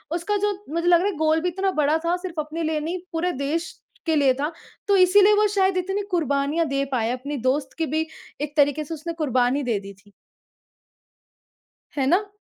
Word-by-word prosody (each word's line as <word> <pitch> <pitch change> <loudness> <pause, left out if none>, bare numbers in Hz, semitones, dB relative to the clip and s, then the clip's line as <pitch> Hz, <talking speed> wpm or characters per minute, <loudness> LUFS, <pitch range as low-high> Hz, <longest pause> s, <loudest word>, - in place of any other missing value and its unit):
उसका 410 +5 -1
जो 415 +1 +1 0.2
मुझे 335 +1 -1
लग 345 -1 +6
रहा 385 - +1
है 405 - -2
गोल 315 +1 +2
भी 360 - 0
इतना 385 +2 -1
बड़ा 295 +2 +3
था 340 +1 +2
सिर्फ़ 355 -3 -6
अपने 310 +2 -5
लिए 315 -1 0
नहीं 335 +4 -3
पूरे 345 +2 0
देश 300 +5 -2 0.3
के 320 -2 +2
लिए 280 -3 +4
था। 290 +5 -2 0.4
तो 400 - +4
इसीलिए 390 +3 +6
वो 420 0 +4
शायद 380 -1 +2
इतनी 385 +3 -1
कुर्बानियाँ 305 -1 +1
दे 275 0 0
पाया। 235 -2 0
अपने 280 +3 -5
दोस्त 270 0 -1
की 325 - 0
भी 315 +2 -1 0.3
एक 295 0 -4
तरीके 290 +1 +3
से 300 - -7
उसने 330 +2 -5
कुर्बानी 270 -3 +1
दे 235 -5 0
दी 200 0 -10
थी। 200 +1 -23 1.9
है 270 - +1
ना? 400 +6 +2
315 Hz, 200 wpm, -23 LUFS, 280-360 Hz, 1.9 s, लग